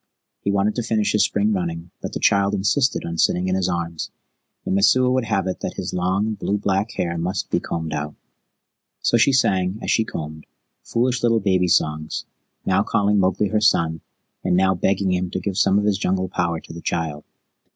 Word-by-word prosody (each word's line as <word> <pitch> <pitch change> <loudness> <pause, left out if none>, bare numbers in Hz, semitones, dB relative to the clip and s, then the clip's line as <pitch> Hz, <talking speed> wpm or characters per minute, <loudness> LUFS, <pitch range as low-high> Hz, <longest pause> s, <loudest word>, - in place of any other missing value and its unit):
He - - -3
wanted 100 +1 +2
to - - +1
finish 110 -2 0
his 105 - +3
spring 105 +1 +1
running, 85 -2 -3
but - - -5
the - - -3
child 100 0 +3
insisted 125 +7 +1
on 85 0 -4
sitting 90 +1 +2
in 95 - 0
his 95 -1 +1
arms, 85 -2 -3 0.6
and - - -1
Messua 125 +6 +4
would 130 -2 +1
have 100 -4 0
it 95 - -3
that - - -4
his - - -4
long, 95 +4 0
blue 100 0 -1
black 100 +2 -1
hair 85 -4 -2
must 90 +3 -3
be - - +2
combed 80 -1 -4
out. 75 +1 -4 0.9
So 120 - +3
she 115 - +4
sang, 95 -7 +2
as - - -2
she 110 - +3
combed, 80 -6 -7 0.4
foolish 125 +1 0
little 115 -1 +3
baby 95 -3 +2
songs, 75 -2 0 0.4
now 95 +1 +3
calling 105 -1 +2
Mowgli 95 +2 +1
her 110 -1 +1
son, 80 -7 +2 0.4
and 90 - +2
now 95 0 +4
begging 95 +1 +1
him 90 0 -1
to 95 - -3
give 95 +1 -3
some 95 0 +3
of 105 - +1
his 100 -2 +1
jungle 95 -1 0
power 85 -2 -1
to - - -12
the 85 - -8
child. 80 -4 -2
95 Hz, 205 wpm, -22 LUFS, 85-105 Hz, 0.9 s, Messua